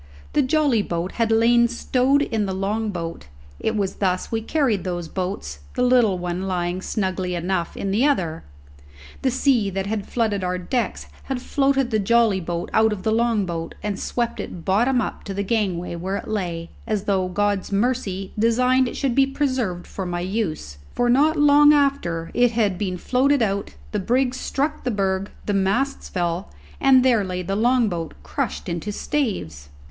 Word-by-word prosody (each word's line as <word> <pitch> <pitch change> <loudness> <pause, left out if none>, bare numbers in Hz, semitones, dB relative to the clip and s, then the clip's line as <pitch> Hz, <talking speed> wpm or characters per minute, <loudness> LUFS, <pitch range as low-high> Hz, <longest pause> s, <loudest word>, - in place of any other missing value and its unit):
The 295 - +4
jolly 280 -4 +2
boat 175 -1 -3
had 230 -1 0
lain 235 +1 +5
stowed 255 +3 +2
in 220 -6 -1
the 190 - -2
long 210 +3 -1
boat; 170 - -5 0.3
it 220 - -1
was 200 -3 -1
thus 185 -2 -1
we 225 -1 0
carried 230 - 0
those 175 -2 -3
boats, 180 - -4 0.2
the 250 - +1
little 245 -6 +4
one 180 +1 -3
lying 180 0 -1
snugly 185 -3 -2
enough 175 0 -2
in 195 - -2
the 215 +6 +2
other. 170 - 0 0.8
The 265 - +2
sea 255 -5 +2
that 195 0 -3
had 205 -1 -3
flooded 215 -5 0
our 180 0 -1
decks 230 +7 -2 0.2
had 265 -2 -2
floated 270 -1 +1
the 215 - +2
jolly 225 -1 +3
boat 170 0 -4
out 220 0 +4
of 200 -3 -4
the 220 - +1
long 225 -2 +2
boat, 165 -2 -5
and 205 -2 -2
swept 240 -1 -2
it 170 -3 -7
bottom 240 +7 +3
up - - -4
to 195 - -5
the 200 - -1
gangway 190 -5 -1
where 190 +4 -3
it - - -7
lay, 175 -6 -3 0.2
as 215 -4 -1
though 190 -3 +1
God's 205 +1 -1
mercy 200 -3 -1
designed 250 +3 +3
it - - -6
should 270 -4 0
be 270 +2 +4
preserved 255 -10 -1
for 190 -2 -5
my 175 0 -2
use; 175 - -3 0.2
for, 245 0 +2
not 300 +5 +4
long 295 0 +7
after 270 - 0
it 245 -1 +3
had 205 -5 +1
been 185 -3 -2
floated 260 +6 +2
out, 200 - -2 0.2
the - - -1
brig 250 +5 +1
struck 280 +3 -2
the 250 - -1
berg, 195 -2 -1 0.2
the 205 - 0
masts 200 +8 0
fell 175 -1 -2 0.3
and 260 -1 +5
there 235 -5 +4
lay 180 -1 -3
the 195 +3 -2
long 240 +2 +3
boat 170 -4 -4
crushed 70 - -3
into 170 +4 -3
staves! 190 - -3
205 Hz, 185 wpm, -23 LUFS, 185-245 Hz, 0.8 s, long